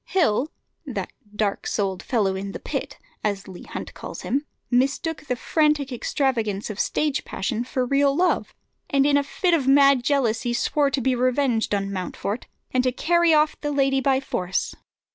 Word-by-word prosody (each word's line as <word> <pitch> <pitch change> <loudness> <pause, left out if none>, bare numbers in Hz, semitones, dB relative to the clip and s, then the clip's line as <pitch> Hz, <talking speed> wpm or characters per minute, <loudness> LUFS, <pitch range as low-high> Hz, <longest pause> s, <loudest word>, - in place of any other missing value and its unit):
Hill, 310 - +2 0.4
"that - - -4 0.2
dark 210 -2 -1
souled 195 -3 -1
fellow 205 -7 0
in 195 +1 -5
the - - -5
pit," - - -4 0.3
as 200 -2 -1
Leigh 185 -2 -10
Hunt - - -6
calls - - -8
him, 285 +4 -1 0.2
mistook 275 +5 0
the 250 - 0
frantic 300 +2 +1
extravagance 230 -5 -1
of 205 - -8
stage 300 -2 0
passion 225 +4 -2
for 255 0 -1
real 275 +2 +3
love, 360 +3 +1 0.3
and 275 -1 +3
in 290 0 +4
a 285 - +5
fit 355 +5 0
of 285 -6 +2
mad 275 -2 +6
jealousy 240 -4 +1
swore 285 +4 +1
to 270 -1 -1
be 260 +2 +2
revenged 250 -3 +1
on 200 0 -2
Mountfort, 195 +4 -4 0.2
and 255 0 +2
to 255 - +2
carry 340 +5 +3
off 305 0 +3
the 295 - -1
lady 270 -1 +2
by 265 -1 +3
force. 185 -8 -2
265 Hz, 175 wpm, -24 LUFS, 220-285 Hz, 0.4 s, mad